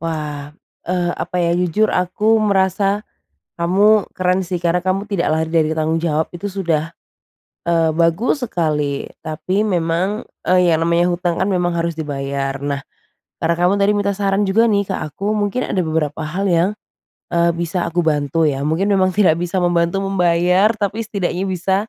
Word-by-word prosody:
Wah, 150 Hz, -3 st, -4 dB, 0.4 s
eee, 175 Hz, -1 st, 0 dB
apa -, -, -5 dB
ya, 170 Hz, -, +1 dB
jujur 180 Hz, +5 st, +1 dB
aku 210 Hz, +5 st, +2 dB
merasa 200 Hz, 0 st, +1 dB, 0.5 s
kamu 200 Hz, +5 st, +3 dB
keren 185 Hz, +1 st, +1 dB
sih 180 Hz, 0 st, -3 dB
karena 175 Hz, +1 st, 0 dB
kamu 190 Hz, +2 st, -1 dB
tidak 200 Hz, -4 st, -1 dB
lari 160 Hz, +1 st, 0 dB
dari 155 Hz, -2 st, +3 dB
tanggung 160 Hz, +1 st, 0 dB
jawab. 160 Hz, -1 st, 0 dB
Itu 195 Hz, +4 st, -5 dB
sudah, 165 Hz, -5 st, -1 dB, 0.8 s
eee, 165 Hz, -2 st, +2 dB
bagus 170 Hz, -, +1 dB
sekali. 150 Hz, -4 st, -1 dB, 0.2 s
Tapi 185 Hz, +7 st, -2 dB
memang, 180 Hz, +4 st, -1 dB, 0.2 s
eee, 180 Hz, -1 st, +4 dB
yang 160 Hz, -, +2 dB
namanya 170 Hz, +2 st, +2 dB
hutang 175 Hz, -1 st, -1 dB
kan -, -, +1 dB
memang 175 Hz, -1 st, 0 dB
harus 170 Hz, 0 st, -1 dB
dibayar. 140 Hz, -3 st, -3 dB
Nah, 140 Hz, -1 st, -2 dB, 0.6 s
karena 170 Hz, +1 st, +2 dB
kamu 180 Hz, +2 st, +3 dB
tadi 200 Hz, -, +4 dB
minta 205 Hz, -1 st, +1 dB
saran 200 Hz, 0 st, 0 dB
juga 225 Hz, +4 st, +3 dB
nih 200 Hz, -1 st, +1 dB
ke -, -, -3 dB
aku. 195 Hz, +8 st, -3 dB
Mungkin 210 Hz, +4 st, -1 dB
ada 185 Hz, -, +1 dB
beberapa 155 Hz, -2 st, -2 dB
hal 180 Hz, +6 st, -2 dB
yang, 175 Hz, 0 st, +2 dB, 0.6 s
eee, 170 Hz, 0 st, +2 dB
bisa 170 Hz, +1 st, -2 dB
aku 175 Hz, +1 st, 0 dB
bantu 150 Hz, 0 st, 0 dB
ya. 140 Hz, 0 st, -2 dB
Mungkin 165 Hz, +6 st, 0 dB
memang 190 Hz, -2 st, +2 dB
tidak 185 Hz, -6 st, +3 dB
bisa 175 Hz, +2 st, -1 dB
membantu 175 Hz, +1 st, +1 dB
membayar, 180 Hz, +2 st, +2 dB
tapi 215 Hz, +1 st, -3 dB
setidaknya 190 Hz, -3 st, -2 dB
bisa, 190 Hz, 0 st, 0 dB
175 Hz, 165 wpm, -19 LUFS, 165-195 Hz, 0.8 s, eee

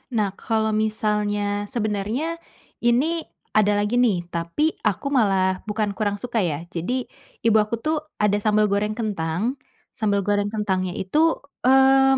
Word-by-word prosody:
Nah, 210 Hz, -3 st, +1 dB
kalau 220 Hz, -1 st, 0 dB
misalnya 210 Hz, -1 st, 0 dB
sebenarnya 230 Hz, +8 st, -2 dB, 0.4 s
ini 285 Hz, +8 st, +1 dB, 0.2 s
ada 210 Hz, -1 st, +3 dB
lagi 205 Hz, +4 st, +1 dB
nih, 210 Hz, -8 st, +2 dB
tapi 170 Hz, -, 0 dB
aku 215 Hz, +5 st, 0 dB
malah 190 Hz, -7 st, +2 dB
bukan 210 Hz, -1 st, -1 dB
kurang 205 Hz, -2 st, 0 dB
suka 240 Hz, -2 st, -1 dB
ya, 165 Hz, -5 st, -1 dB
jadi 175 Hz, +8 st, -2 dB, 0.5 s
ibu 225 Hz, -1 st, +5 dB
aku 215 Hz, +2 st, 0 dB
tuh 310 Hz, +1 st, +1 dB, 0.3 s
ada 205 Hz, -1 st, +3 dB
sambel 210 Hz, 0 st, +2 dB
goreng 210 Hz, +1 st, +1 dB
kentang. 210 Hz, -, -2 dB, 0.4 s
Sambel 205 Hz, -3 st, +1 dB
goreng 205 Hz, +1 st, +1 dB
kentangnya 190 Hz, -4 st, -1 dB
itu, 305 Hz, -, +1 dB, 0.2 s
mmm, 270 Hz, +1 st, +6 dB
210 Hz, 140 wpm, -23 LUFS, 200-240 Hz, 0.5 s, mmm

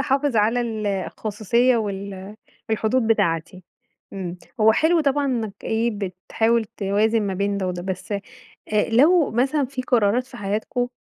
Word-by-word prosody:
حافِظ 275 Hz, -1 st, +1 dB
على 225 Hz, +3 st, +3 dB
ال 220 Hz, -3 st, -3 dB
الخصوصية 215 Hz, +5 st, 0 dB
وال 200 Hz, -1 st, -5 dB, 0.3 s
الحدود 220 Hz, +2 st, +1 dB
بتاعتي. 185 Hz, -4 st, 0 dB, 0.5 s
إمم. 185 Hz, -3 st, -5 dB, 0.2 s
هو 220 Hz, +1 st, +6 dB
حلو 325 Hz, +7 st, +3 dB
طبعًا 285 Hz, -1 st, +1 dB
إنك 225 Hz, -6 st, -2 dB
إيه، 225 Hz, +2 st, 0 dB
بتحاول 220 Hz, +5 st, 0 dB
توازِن 210 Hz, +2 st, 0 dB
ما 195 Hz, -2 st, -2 dB
بين 200 Hz, +1 st, -1 dB
ده 190 Hz, -, -2 dB
وده، 175 Hz, -1 st, -3 dB
بس 190 Hz, +2 st, -5 dB
آآ 200 Hz, -, -2 dB, 0.7 s
لو 305 Hz, +7 st, +5 dB
مثلًا 270 Hz, +5 st, +1 dB
في 255 Hz, 0 st, -5 dB
قرارات 245 Hz, 0 st, +2 dB
في 265 Hz, -, -12 dB
حياتكم 220 Hz, +4 st, -2 dB
220 Hz, 145 wpm, -23 LUFS, 200-245 Hz, 0.7 s, هو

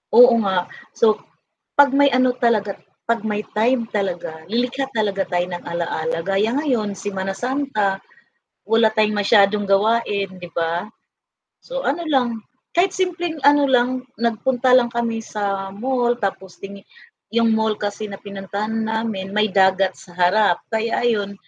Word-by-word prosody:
oo 245 Hz, 0 st, +9 dB
nga, 190 Hz, -3 st, 0 dB, 0.3 s
so 215 Hz, -2 st, +3 dB, 0.6 s
'pag 285 Hz, -1 st, +6 dB
may 280 Hz, 0 st, +5 dB
ano 255 Hz, 0 st, +3 dB
talaga, 215 Hz, -4 st, +1 dB, 0.3 s
'pag 230 Hz, -2 st, 0 dB
may 210 Hz, 0 st, -2 dB
time 230 Hz, +2 st, +1 dB
talaga 175 Hz, -5 st, -3 dB
lilikha 250 Hz, +4 st, -1 dB
talaga 200 Hz, -3 st, 0 dB
tayo 175 Hz, 0 st, 0 dB
ng 175 Hz, -, -6 dB
ala-ala, 165 Hz, -1 st, -2 dB
gaya 200 Hz, +5 st, +1 dB
ngayon, 235 Hz, -9 st, -1 dB
Semana 195 Hz, -1 st, -4 dB
Santa 245 Hz, -7 st, -1 dB, 0.7 s
wala 225 Hz, 0 st, +4 dB
tayong 215 Hz, -1 st, +1 dB
masyadong 205 Hz, 0 st, +3 dB
gawain 200 Hz, 0 st, +1 dB
'di 175 Hz, -1 st, -10 dB
ba? 170 Hz, +3 st, -1 dB, 0.8 s
So, -, -, -4 dB
ano 330 Hz, +5 st, -1 dB
lang, 245 Hz, -7 st, 0 dB, 0.3 s
kahit 370 Hz, +2 st, +3 dB
simpleng 350 Hz, -4 st, -2 dB
ano 290 Hz, 0 st, +5 dB
lang, 255 Hz, 0 st, +1 dB, 0.2 s
nagpunta 245 Hz, +2 st, +1 dB
lang 240 Hz, -2 st, +3 dB
kami 230 Hz, -1 st, -1 dB
sa 195 Hz, -2 st, -3 dB
mall 245 Hz, +1 st, 0 dB
tapos 190 Hz, -2 st, -4 dB
tini 200 Hz, 0 st, -10 dB, 0.5 s
'yung 230 Hz, -1 st, +3 dB
mall 220 Hz, -1 st, +1 dB
kasi 205 Hz, +1 st, -4 dB
na 200 Hz, -1 st, -8 dB
pinuntahan 200 Hz, +2 st, -5 dB
namin 220 Hz, -4 st, -3 dB
may 210 Hz, 0 st, +2 dB
dagat 190 Hz, 0 st, +3 dB
sa 175 Hz, -, -15 dB
harap, 180 Hz, +1 st, +3 dB
kaya 225 Hz, +2 st, 0 dB
ayon 205 Hz, -4 st, 0 dB
215 Hz, 145 wpm, -21 LUFS, 195-245 Hz, 0.8 s, oo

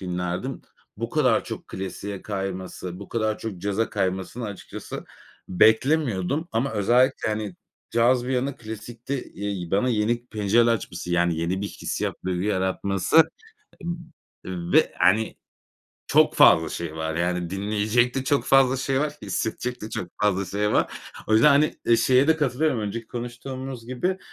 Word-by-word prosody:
dinlerdim. 90 Hz, +7 st, -3 dB, 0.3 s
Bu 115 Hz, +2 st, -4 dB
kadar 130 Hz, -7 st, +3 dB
çok -, -, -7 dB
klasiğe 95 Hz, +1 st, -6 dB
kayması, 95 Hz, -2 st, -5 dB
bu 100 Hz, -, -9 dB
kadar 110 Hz, -2 st, -1 dB
çok 110 Hz, -5 st, -5 dB
caza 100 Hz, +4 st, -1 dB
kaymasını, 95 Hz, +4 st, -2 dB
açıkçası 100 Hz, -3 st, -7 dB, 0.4 s
beklemiyordum 120 Hz, -, +2 dB
ama 125 Hz, +5 st, 0 dB
özellikle, 120 Hz, +5 st, +2 dB
hani, 105 Hz, -4 st, -3 dB, 0.3 s
caz 120 Hz, +1 st, +3 dB
bir -, -, -3 dB
yana 125 Hz, +1 st, +1 dB
hani 140 Hz, -, -12 dB
klasikte, 115 Hz, +3 st, -6 dB
eee, 100 Hz, -4 st, -5 dB
bana 100 Hz, +6 st, +2 dB
yeni 120 Hz, +1 st, 0 dB
pencereler 110 Hz, +2 st, +3 dB
açması, 90 Hz, -5 st, -4 dB
yani, 85 Hz, -1 st, +2 dB
yeni 90 Hz, +4 st, -1 dB
bir 100 Hz, -, -3 dB
hissiyat -, -, -3 dB
duygu 90 Hz, -1 st, -1 dB
yaratması 95 Hz, -, +3 dB, 1.2 s
b 90 Hz, -2 st, -5 dB
ve -, -, +2 dB
hani 105 Hz, +5 st, +3 dB, 0.7 s
çok -, -, +4 dB
fazla 80 Hz, 0 st, +6 dB
şey 85 Hz, -2 st, -5 dB
var 80 Hz, 0 st, -3 dB
yani 90 Hz, 0 st, -1 dB
dinleyecek 105 Hz, +5 st, +1 dB
de 135 Hz, -, -1 dB
çok 140 Hz, +1 st, +1 dB
fazla 135 Hz, -1 st, +5 dB
şey 135 Hz, 0 st, 0 dB
var, 150 Hz, 0 st, -1 dB
hissedecek 110 Hz, +5 st, -3 dB
de 110 Hz, -, -6 dB
çok 90 Hz, -, -4 dB
fazla 100 Hz, -2 st, +2 dB
şey 105 Hz, +3 st, -1 dB
var. -, -, +2 dB, 0.3 s
O 110 Hz, -, +2 dB
yüzden, 110 Hz, +6 st, +6 dB
hani, 145 Hz, +2 st, +4 dB
eee, 115 Hz, -, +5 dB
şeye 130 Hz, +4 st, +4 dB
de 160 Hz, -, +5 dB
katılıyorum 145 Hz, -2 st, +1 dB
önceki 110 Hz, +2 st, -4 dB
konuştuğumuz 125 Hz, +1 st, -6 dB
gibi. 180 Hz, +10 st, -1 dB
110 Hz, 155 wpm, -25 LUFS, 95-125 Hz, 1.2 s, fazla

